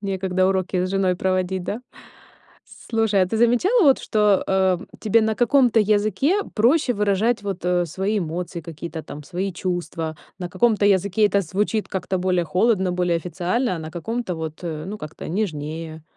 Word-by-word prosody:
Некогда 190 -2 0
уроки 185 -1 0
с 185 - -1
женой 190 -2 +1
проводить, 185 0 -1
да? 225 +4 -4 1.1
Слушай, 225 -4 +2
а 185 - +2
ты 220 - -2
замечала 245 - +3
вот, 275 -4 +5
что, 210 -2 +2
э, 190 -2 +2 0.2
тебе 225 +1 +3
на 220 0 +1
каком-то 240 -1 +4
языке 215 - +2
проще 250 +4 +3
выражать, 210 +2 +1
вот, 195 -3 -5
э, 180 0 +2
свои 195 +6 -1
эмоции, 170 +1 -4
какие-то 165 0 -7
там 150 0 -9
свои 185 +4 -3
чувства? 170 -3 -3 0.2
На 180 -1 -4
каком-то 215 0 +2
языке 200 +2 +3
это 200 -1 +2
звучит 205 +4 -1
как-то 190 0 -2
более 180 -1 +1
холодно, 190 0 +1
более 180 -1 +1
официально, 180 - -1
а - - -5
на 155 0 -7
каком-то, 190 +2 -4
вот, 160 -1 -6
э, 155 -2 -4
ну, 210 +2 -6
как-то 155 +1 -8
нежнее. 160 -4 -4
190 Hz, 165 wpm, -22 LUFS, 175-215 Hz, 1.1 s, вот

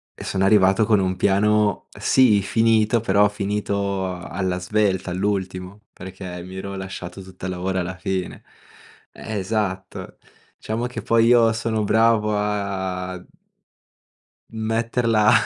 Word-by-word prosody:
e - - -9
sono 95 0 0
arrivato 100 +1 +4
con 105 -2 +3
un 95 -1 0
piano, 105 +1 +2
sì 115 -6 +4
finito, 110 +1 +2
però 105 -1 +4
finito 100 -2 -2
alla 90 +1 -3
svelta, 95 -1 0
all'ultimo, 95 0 -3
perché 95 -1 -8
mi 95 +1 -10
ero 100 +1 -6
lasciato 95 -1 -7
tutto 95 0 -10
il 95 - -2
lavoro 95 +1 -2
alla 95 +1 -4
fine. 95 -1 -4 0.7
Eh, 110 -1 -6
esatto, 95 -2 -3 0.4
diciamo 115 +3 -3
che 125 - -6
poi 115 0 +3
io 115 -1 +5
sono 110 -1 -1
bravo 110 0 +3
a 95 -3 -3 1.3
metterla 115 0 +1
100 Hz, 125 wpm, -22 LUFS, 95-110 Hz, 1.3 s, io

